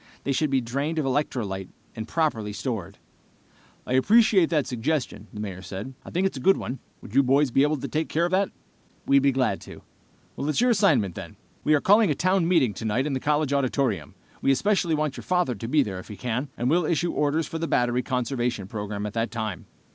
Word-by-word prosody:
They 140 - -1
should 150 +3 +1
be 135 -1 +2
drained 140 +7 -2
of 155 - 0
electrolyte 120 -9 -2 0.3
and 110 -1 -5
properly 115 -11 -1
stored." 100 -2 -4 0.9
"I - - -3
appreciate 200 - +5
that 150 -4 +1
suggestion," 125 -3 -2
the 105 - -9
Mayor 95 -3 -5
said. 100 +7 -7
"I - - -10
think 180 +3 0
it's 190 - -1
a - - -9
good 195 +8 +4
one. 130 - -5 0.2
Would 100 - -11
you 135 - +6
boys 135 +1 +3
be 135 - +3
able 150 +2 +2
to - - -5
take 155 +1 -2
care 165 +2 +1
of 175 - -2
that?" 190 +1 +2 0.6
"We'd 140 - +5
be 140 0 +4
glad 130 -7 0
to." - - -12 0.6
"It's 150 +2 0
your 245 +1 +4
assignment, 125 - +3
then. - - -9 0.3
We 155 - +4
are 145 - +1
calling 205 +1 +5
a - - +1
town 185 -1 +2
meeting 155 - +3
tonight 110 +6 -1
in 150 - -2
the 130 - -1
college 150 0 +1
auditorium. 130 - 0 0.3
We - - +1
especially 175 +2 +2
want 150 -2 -2
your - - -7
father 180 -8 +1
to 115 +1 -6
be 145 +3 +3
there 95 -5 -5
if - - -11
he 105 - -9
can, 125 +6 -2
and 120 - -1
we'll 165 +4 +3
issue 170 +2 0
orders 150 +2 0
for 165 - -5
the 165 - -2
battery 120 -2 +1
conservation 125 -4 -2
program 105 0 -5
at 105 - -5
that 115 0 -1
time." 110 -6 -5
135 Hz, 225 wpm, -25 LUFS, 115-155 Hz, 0.9 s, you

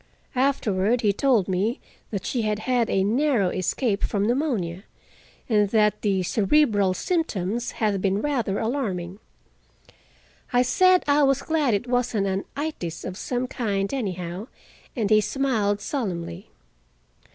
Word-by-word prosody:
Afterward 240 -4 +1
he 205 -2 +2
told 235 -4 +2
me 200 +6 0 0.3
that 200 -4 -4
she 245 - -1
had 215 -1 0
had 240 +1 0
a 190 - +2
narrow 235 -2 +2
escape 200 +4 -1
from 200 -1 0
pneumonia, 220 - -1 0.6
and 210 -3 +3
that 210 -1 +2
the 195 -3 +1
cerebral 205 - +2
symptoms 235 - -1
had 205 -4 0
been 195 +1 +1
rather 240 -8 -1
alarming. 205 -7 -2 1.3
I 245 -1 +4
said 370 +8 +4
I 290 +1 +4
was 275 -1 +3
glad 300 -8 +1
it 200 - -2
wasn't 245 -4 0
an 195 0 -1
"itis" 285 - -4
of 185 - -5
some 245 +5 -2
kind, 205 -5 -2
anyhow, 185 -4 -4 0.5
and 225 -5 0
he 215 0 +6
smiled 215 -6 0
solemnly. 185 - -4
215 Hz, 135 wpm, -24 LUFS, 195-255 Hz, 1.3 s, he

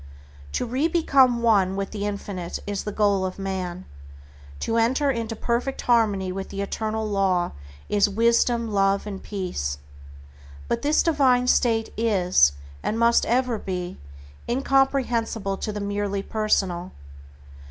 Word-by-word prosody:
To - - -1
re 260 +6 0
become 270 -8 +3
one 195 -5 +3
with 195 0 -3
the 205 -1 -3
Infinite 200 -4 -5
is 205 -1 -4
the 210 - -3
goal 200 -2 +2
of 185 -1 -3
man. 185 -2 -4 0.8
To 225 - 0
enter 260 +5 +2
into 230 -2 -3
perfect 240 +4 -2
harmony 210 -6 +2
with 190 +1 -5
the 195 - -6
Eternal 220 +2 -3
Law 195 -4 +1 0.4
is 205 0 +2
Wisdom, 235 +2 +2
Love 195 0 +2
and 195 -2 -6
Peace. 175 - -3 0.9
But - - -1
this 295 +1 +2
divine 265 -6 +3
state 230 -3 +2
is, 185 - +3 0.3
and 220 - -2
must 235 0 +3
ever 245 -2 +1
be, 180 -2 -5 0.5
incomprehensible 245 -6 +1
to 215 - -3
the 210 - -5
merely 200 -1 -2
personal. 190 -5 -1
210 Hz, 135 wpm, -24 LUFS, 195-235 Hz, 0.9 s, become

